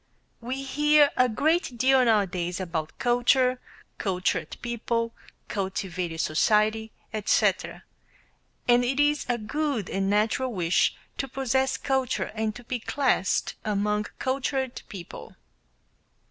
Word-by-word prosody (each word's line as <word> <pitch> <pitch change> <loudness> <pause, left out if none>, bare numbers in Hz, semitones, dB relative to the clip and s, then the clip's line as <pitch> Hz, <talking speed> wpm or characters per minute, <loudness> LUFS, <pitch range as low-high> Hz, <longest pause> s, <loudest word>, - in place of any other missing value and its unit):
We 255 +3 -4
hear 295 +1 +4
a 250 0 +4
great 300 +2 +1
deal 260 +1 +4
now 225 -3 +4
a - - -1
days 180 -1 -3
about 165 -4 -4
culture, 250 +1 +2 0.4
cultured 185 -2 -1
people, 235 -1 -2 0.3
cultivated 185 -4 -3
society, 215 +6 +2 0.2
etc., 215 -2 +1 0.8
and 245 0 +5
it 265 +3 0
is 295 0 +2
a 245 - +2
good 245 -1 -2
and 195 0 0
natural 220 +5 +1
wish 175 -3 +2 0.2
to 270 - -1
possess 265 0 0
culture 265 -2 -1
and 215 -1 -2
to 245 - -10
be 245 +1 -3
classed 250 -5 0
among 210 0 0
cultured 265 -1 -2
people. 180 -4 -9
235 Hz, 120 wpm, -26 LUFS, 205-265 Hz, 0.8 s, and